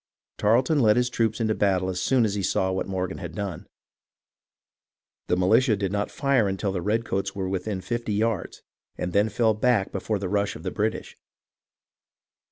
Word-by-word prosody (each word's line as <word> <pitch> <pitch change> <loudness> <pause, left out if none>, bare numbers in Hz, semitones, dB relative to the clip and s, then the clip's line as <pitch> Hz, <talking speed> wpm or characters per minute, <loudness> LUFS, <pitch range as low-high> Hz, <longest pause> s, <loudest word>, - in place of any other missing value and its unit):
Tarleton 125 +8 +3
led 110 -4 +4
his 125 0 +1
troops 110 -2 0
into 110 -1 +1
battle 95 -3 +1
as 90 -1 -2
soon 130 -3 +3
as 105 - -1
he 100 - -2
saw 95 0 +1
what 95 - -2
Morgan 95 -1 -3
had 85 -3 -7
done. 100 -5 -5 1.6
The 90 - +1
militia 110 +5 +4
did 100 -2 -2
not 100 0 -1
fire 135 -6 +1
until 95 +1 -1
the 95 -2 -3
redcoats 100 -1 -1
were 95 -1 -2
within 95 +1 -3
fifty 115 +3 -3
yards, 110 -2 -1 0.3
and 90 0 -3
then 105 +2 +3
fell 110 +1 +2
back 110 -2 +1
before 105 +2 -2
the 100 -1 -3
rush 100 +1 0
of 80 - -10
the 95 - -3
British. 110 +1 -2
100 Hz, 175 wpm, -25 LUFS, 95-110 Hz, 1.6 s, led